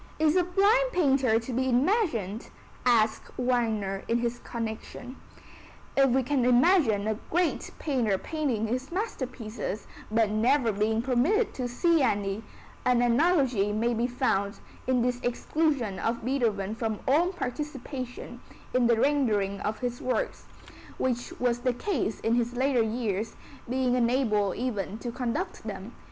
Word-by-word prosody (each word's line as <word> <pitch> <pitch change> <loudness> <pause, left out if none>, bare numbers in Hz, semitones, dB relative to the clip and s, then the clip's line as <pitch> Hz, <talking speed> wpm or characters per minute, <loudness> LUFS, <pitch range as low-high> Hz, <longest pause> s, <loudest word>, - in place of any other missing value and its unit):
"Is 310 +1 +3
a 365 - +5
blind 410 +8 +3
painter 270 -9 +3
to 235 +2 -6
be 260 +2 +1
imagined?" 245 - +1 0.4
asks 225 -3 +2
Wagner 225 -6 0
in 230 +1 +1
this 240 0 -2
connection. 235 +2 -6 0.8
If 275 -1 +5
we 260 +2 +2
can 270 0 +1
imagine 245 - +4
a 215 0 -1
great 350 0 0
painter 240 -10 0
painting 275 -5 -2
his 255 +6 -3
masterpieces, 250 - -4 0.2
but 220 -1 +2
never 235 +3 +3
being 220 +2 0
permitted 270 - +2
to 250 -2 -3
see 330 +6 +2
any, 205 -4 0 0.4
an 245 -1 +3
analogy 245 - +3
may 230 +3 +1
be 235 +1 0
found 230 -5 0 0.3
in 255 -2 +2
the 245 0 0
exclusion 245 - 0
of 230 0 -2
Beethoven 220 -7 0
from 225 -2 -2
all 325 +7 +3
participation 270 -5 -6 0.3
in 250 -2 +3
the 235 -1 +3
rendering 215 -9 +1
of 215 +1 -3
his 245 -1 -3
works, 250 -3 -2 0.5
which 245 -2 -1
was 245 -1 +1
the 250 0 0
case 245 - -2
in 225 - +1
his 240 0 +1
later 260 -1 +2
years, 220 -2 -2 0.3
being 255 0 +1
unable 235 -5 +2
even 215 -5 -3
to 240 +1 -5
conduct 255 +8 -3
them. - - -6
245 Hz, 140 wpm, -28 LUFS, 220-270 Hz, 0.8 s, a